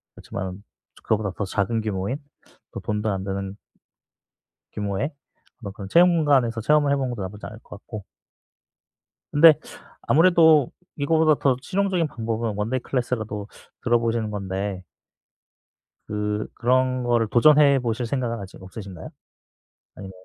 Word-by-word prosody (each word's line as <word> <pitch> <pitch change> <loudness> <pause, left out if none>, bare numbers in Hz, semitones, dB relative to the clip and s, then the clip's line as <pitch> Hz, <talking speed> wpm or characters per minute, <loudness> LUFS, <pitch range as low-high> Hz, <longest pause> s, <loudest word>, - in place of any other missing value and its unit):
그렇지만은 95 0 -6 0.4
그거보다 105 -3 0
더 100 - -1
작은 100 +3 -1
규모인 105 +4 -2 0.5
또 - - -6
돈도 105 +1 -2
안 95 0 -3
드는 95 0 -4 1.1
규모의 105 +7 -2 0.5
어떤 100 -3 -7
그런 100 -2 -8
체험관에서 145 - +4
체험을 145 +3 +3
해보는 130 -3 -1
것도 115 - -5
나쁘지 105 +3 -8
않을 110 +1 -10
것 105 - -12
같고 105 -1 -9 1.3
근데 155 +2 +8 0.5
아무래도 160 -4 +5 0.2
이거보다 155 +1 +3
더 135 -3 +3
실용적인 185 -1 0
방법은 115 -3 -3
원데이 115 +5 -1
클래스라도 110 -5 -3 0.4
들어보시는 115 -2 +1
건데 95 -1 -4 1.2
그 105 0 -2
그런 130 +1 +1
거를 120 -2 +2
도전해보실 130 -3 +4
생각은 115 -2 -2
아직 95 -1 -10
없으신가요? 95 -3 -9 0.9
아니면 95 -1 -9
115 Hz, 310 characters per minute, -24 LUFS, 100-140 Hz, 1.3 s, 근데